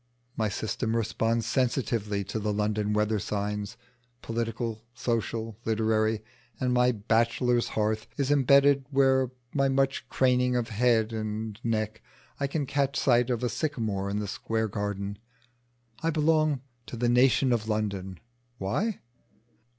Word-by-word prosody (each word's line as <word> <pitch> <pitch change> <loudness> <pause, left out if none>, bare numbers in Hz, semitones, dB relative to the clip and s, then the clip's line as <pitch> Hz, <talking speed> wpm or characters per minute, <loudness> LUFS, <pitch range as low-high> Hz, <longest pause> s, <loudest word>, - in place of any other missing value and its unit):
My 110 -1 0
system 110 +2 -2
responds 115 0 0
sensitively 115 -5 0
to 100 +3 -4
the 105 0 -1
London 105 0 0
weather 105 0 +1
signs, 105 +2 -3 0.5
political, 115 -1 -3
social, 115 -2 -2
literary; 110 -1 +1 0.4
and 125 -1 +1
my 125 0 +4
bachelor's 115 +2 +1
hearth 110 0 0
is 140 -1 +1
imbedded 140 0 +5
where 135 -2 +3 0.2
by 135 -1 +2
much 135 0 0
craning 125 -1 +2
of 120 -2 -1
head 115 0 +2
and 110 -1 -4
neck 110 -2 -1 0.4
I 140 - 0
can 145 +1 -2
catch 140 0 0
sight 120 -1 +3
of 120 -1 -1
a 125 - +1
sycamore 110 -8 -2
in 100 - -1
the 105 0 -2
Square 110 +2 -2
garden: 100 -1 -3 0.8
I 165 - +1
belong 155 -3 +2 0.3
to 120 - -6
the 120 +1 +1
"Nation 125 +1 +4
of 110 -1 -1
London." 100 -4 -2 0.4
Why? 185 - -1
115 Hz, 135 wpm, -28 LUFS, 105-125 Hz, 0.8 s, imbedded